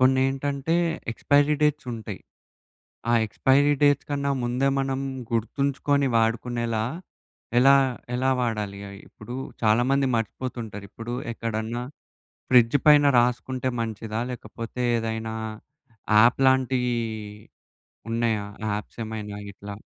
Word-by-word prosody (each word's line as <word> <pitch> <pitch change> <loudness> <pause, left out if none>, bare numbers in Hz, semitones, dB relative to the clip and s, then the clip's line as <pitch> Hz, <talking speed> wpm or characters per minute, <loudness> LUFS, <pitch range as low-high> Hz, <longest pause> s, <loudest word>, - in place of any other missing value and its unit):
కొన్నేంటంటే, 135 +4 +2 0.4
expiry 145 +5 +3
డేట్సుంటయి, 130 -7 -1 0.9
ఆ - - +4
expiry 140 +6 +3
dates 145 -1 +3
కన్నా 140 -1 0
ముందే, 125 +3 +1
మనం 135 0 -1 0.3
గుర్తుంచుకొని 140 +4 0
వాడుకునేలా, 115 0 0 0.8
ఎలా 135 +2 +7 0.4
ఎలా 130 +1 +1
వాడాలి 105 -4 -2
అయ్యి? 100 +1 -11
ఇప్పుడూ 120 +3 -9 0.3
చాలామంది 125 +5 +3
మర్చిపోతుంటారు, 115 -2 -4
ఇప్పుడు 120 +2 -5 0.2
ఎక్కడన్నా, 115 +1 -3 0.7
ఫ్రిడ్జు 125 +2 +5
పైన 145 -1 +7
రాసుకుంటే 125 +1 0
మంచిదా? 110 0 -4
లేకపోతే, 115 +1 -7 0.2
ఏదైనా 110 0 -3 0.8
యాప్ 115 +4 +5
లాంటియ్యి 130 -2 +2 1.1
ఉన్నయా 115 -2 0 0.3
యాప్సేమైనా 105 0 -5
ఇట్లా? 100 +1 -9
120 Hz, 95 wpm, -25 LUFS, 110-135 Hz, 1.1 s, ఎలా